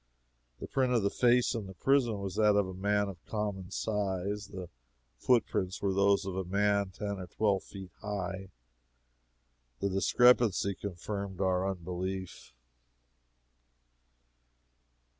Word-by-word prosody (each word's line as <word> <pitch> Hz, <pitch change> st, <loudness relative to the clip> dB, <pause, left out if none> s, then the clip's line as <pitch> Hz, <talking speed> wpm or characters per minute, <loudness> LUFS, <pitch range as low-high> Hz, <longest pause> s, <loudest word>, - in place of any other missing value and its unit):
The -, -, -5 dB
print 130 Hz, -2 st, +1 dB
of 115 Hz, -4 st, +2 dB
the 100 Hz, -, +1 dB
face 125 Hz, 0 st, +3 dB
in 110 Hz, -5 st, -4 dB
the 95 Hz, -, -10 dB
prison 130 Hz, -2 st, +2 dB
was 95 Hz, -2 st, -4 dB
that 105 Hz, -1 st, +4 dB
of 100 Hz, -2 st, +2 dB
a 95 Hz, -, -6 dB
man 100 Hz, +2 st, +1 dB
of 95 Hz, -4 st, -9 dB
common 105 Hz, -4 st, -3 dB
size; 100 Hz, -1 st, -2 dB
the 95 Hz, -2 st, -7 dB, 0.5 s
footprints 105 Hz, -6 st, +1 dB
were 100 Hz, -1 st, 0 dB
those 100 Hz, +1 st, +3 dB
of 95 Hz, -2 st, -4 dB
a 95 Hz, -, -1 dB
man 100 Hz, +1 st, +1 dB
ten 100 Hz, +1 st, -5 dB
or 90 Hz, -, -6 dB
twelve 100 Hz, +2 st, +1 dB
feet 95 Hz, -2 st, -10 dB
high. 95 Hz, -2 st, -4 dB, 1.3 s
The 100 Hz, -, 0 dB
discrepancy 110 Hz, 0 st, +4 dB
confirmed 100 Hz, 0 st, -5 dB
our 95 Hz, 0 st, +1 dB
unbelief. 95 Hz, 0 st, -5 dB
100 Hz, 130 wpm, -31 LUFS, 95-105 Hz, 1.3 s, that